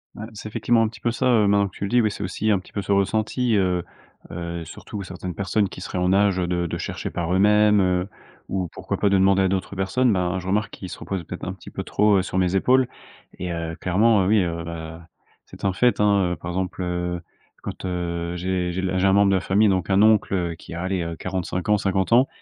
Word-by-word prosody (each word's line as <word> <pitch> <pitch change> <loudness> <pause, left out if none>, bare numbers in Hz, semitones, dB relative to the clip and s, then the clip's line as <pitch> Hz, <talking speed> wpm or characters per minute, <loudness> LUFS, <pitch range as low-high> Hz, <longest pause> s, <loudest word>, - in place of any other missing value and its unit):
Ouais, 110 - -6
c'est 110 0 -8
effectivement 115 +2 +2
un 110 - +3
petit 110 -2 -11
peu 120 - +1
ça, 120 - 0
heu, 110 -5 +4
maintenant 100 0 +3
que 95 - -14
tu - - -5
le 100 - -1
dis. 125 0 +4
Oui, 110 - +2
c'est 100 - -6
aussi 95 +4 -2
un 100 - +4
petit - - -16
peu 100 - -3
ce 100 - -4
ressenti, 110 +4 +1
heu 90 -3 +1 0.5
heu, 85 0 -5
surtout 100 +6 -8
certaines 90 -2 -7
personnes 100 0 0
qui - - -10
seraient 90 - -5
en 90 +1 +2
âge 100 -1 +3
de 90 -1 0
de - - -3
chercher - - -4
par 85 0 -3
eux-mêmes, 105 +1 +5
heu, 90 0 +1 0.4
ou 95 -2 -1
pourquoi - - -4
pas 100 - +1
de 100 - +3
demander 95 0 +4
à - - +3
d'autres 95 +1 -2
personnes. 105 +6 +1
Ben, 90 -1 0
je 90 - -8
remarque 105 +3 0
qu'ils 95 - -8
se - - -7
reposent 95 -3 -4
peut-être 90 - -7
un 95 - -3
petit 95 - -12
peu - - -5
trop, 105 -1 +3
heu, - - +3
sur 95 - -2
mes 90 +1 +1
épaules 130 +5 +3 0.5
et 90 -1 -4
heu, 85 0 -4
clairement, 100 +2 +3
heu, - - 0
oui, 105 0 +4
heu, 85 -1 -3
ben, 80 0 -7 0.4
c'est - - -14
un 95 -1 +1
fait, 120 +5 +2
hein, 100 -4 +3
heu. - - -3
Par 90 - -8
exemple, 90 0 -3
heu, 90 -1 -2 0.4
quand, - - -7
heu, 85 -1 -3
j'ai 90 0 -1
j'ai 95 +2 -2
j'ai 95 0 +1
un 95 - +4
membre 100 0 +5
de 95 - +3
la 95 - +1
famille, 100 +3 +3
donc 95 0 0
un 95 +2 +4
oncle 95 -6 +3
qui - - -11
a, 85 - -4
allez, 95 -1 -1
heu, 85 0 -4
45 90 0 -3
ans, 105 - +5
50 95 +2 0
ans, 125 +3 +6
95 Hz, 255 wpm, -23 LUFS, 90-105 Hz, 0.5 s, ans